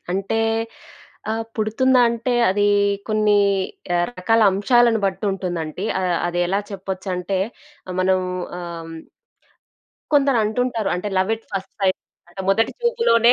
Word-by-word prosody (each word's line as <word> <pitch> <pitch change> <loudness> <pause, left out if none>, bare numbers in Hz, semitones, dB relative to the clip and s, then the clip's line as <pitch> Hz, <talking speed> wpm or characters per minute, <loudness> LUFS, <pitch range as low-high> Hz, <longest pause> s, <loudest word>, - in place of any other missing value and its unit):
అంటే 195 +3 -1 0.9
ఆహ్, 225 +1 -2
పుడుతుందా 250 +4 +3
అంటే 235 +2 -2 0.2
అది 205 +2 +2 0.4
కొన్ని 215 -1 +3 0.6
ఆహ్, 175 - +2
రకాల 225 +5 +2
అంశాలను 230 +3 +3
బట్టి 195 +2 -3
ఉంటుందంటి. 175 -2 -4 0.2
ఆహ్, 180 -2 +1
అదెలా 175 +2 0
చెప్పొచ్చంటే 190 -1 -3 0.6
మనం 185 0 +3 0.4
ఆహ్, 170 -1 -6
హ్మ్. 165 - -8 1.2
కొందరంటుంటారు. 245 -4 +2
అంటే 180 +4 -3
లవ్ 190 +3 +1
ఎట్ 225 - -22
ఫస్ట్ 195 -1 -5
సైట్ 190 -1 +1 0.3
అంటే 175 +2 -9
మొదటి 225 +4 +3
చూపులోనే 460 - +4
200 Hz, 115 wpm, -21 LUFS, 185-230 Hz, 1.2 s, చూపులోనే